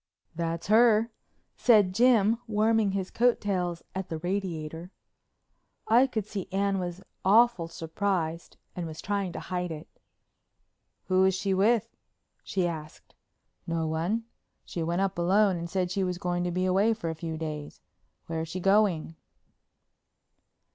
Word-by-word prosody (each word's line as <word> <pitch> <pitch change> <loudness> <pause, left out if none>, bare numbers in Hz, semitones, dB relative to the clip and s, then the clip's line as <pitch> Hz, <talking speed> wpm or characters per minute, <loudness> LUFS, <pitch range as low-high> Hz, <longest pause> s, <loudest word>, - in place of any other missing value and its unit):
"That's 165 0 -3
her," 225 +1 +4 0.4
said 210 -6 +4
Jim, 230 -1 +4
warming 215 -1 +2
his 190 -1 -3
coat 245 0 +3
tails 180 -4 -2
at 190 -1 -4
the 160 - -3
radiator. 170 -2 -4 1.0
I 240 +4 +5
could 220 -6 -3
see 205 -3 -5
Anne 195 0 +1
was 180 +1 -5 0.2
awful 215 -3 +4
surprised 165 0 -3 0.2
and 175 -2 -4
was 155 0 -8
trying 200 -3 -2
to - - -5
hide 180 -1 -3
it. 155 0 -7 1.2
"Who 185 0 +2
was 190 -1 +4
she 195 0 -1
with?" 225 +4 +2 0.5
she 185 -2 0
asked. 155 -2 -8 0.5
"No 165 -1 -1
one. 170 +9 -1 0.4
She 170 - -5
went 170 +3 0
up 195 -2 -1
alone 195 +3 +3
and 170 0 -5
said 180 -1 -1
she 195 +1 0
was 180 -1 -2
going 175 0 -1
to 175 - -1
be 185 +1 0
away 200 +5 +3
for 170 -7 -3
a 160 - -10
few 165 -2 -4
days. 155 -2 -6 0.5
Where's 165 0 -3
she 185 - -4
going?" 195 -4 +2
185 Hz, 150 wpm, -28 LUFS, 170-205 Hz, 1.2 s, I